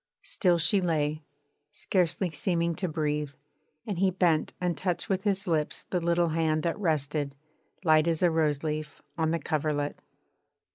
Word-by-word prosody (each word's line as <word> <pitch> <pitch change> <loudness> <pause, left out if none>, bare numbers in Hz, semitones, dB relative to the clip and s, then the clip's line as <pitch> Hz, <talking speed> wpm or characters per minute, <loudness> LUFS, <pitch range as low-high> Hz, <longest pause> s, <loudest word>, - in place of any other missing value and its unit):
Still 180 -3 +2
she 190 +4 +2
lay, 155 -3 0 0.5
scarcely 180 -1 0
seeming 170 +2 0
to 180 +3 -2
breathe, 150 -2 -2 0.5
and 200 -5 -3
he 190 0 +4
bent 175 -4 +2
and 180 -2 0
touched 180 +3 -2
with 190 0 0
his 195 -1 +1
lips 155 -3 +1
the 180 - +1
little 170 0 +2
hand 155 -1 +1
that 170 +2 -1
rested, 150 -5 -1 0.5
light 155 -1 +4
as 165 +1 +1
a 175 - +5
rose 155 -3 +1
leaf, 155 -1 -4
on 160 -1 +1
the 165 - +1
coverlet.... 150 -1 -1
165 Hz, 155 wpm, -28 LUFS, 155-180 Hz, 0.5 s, a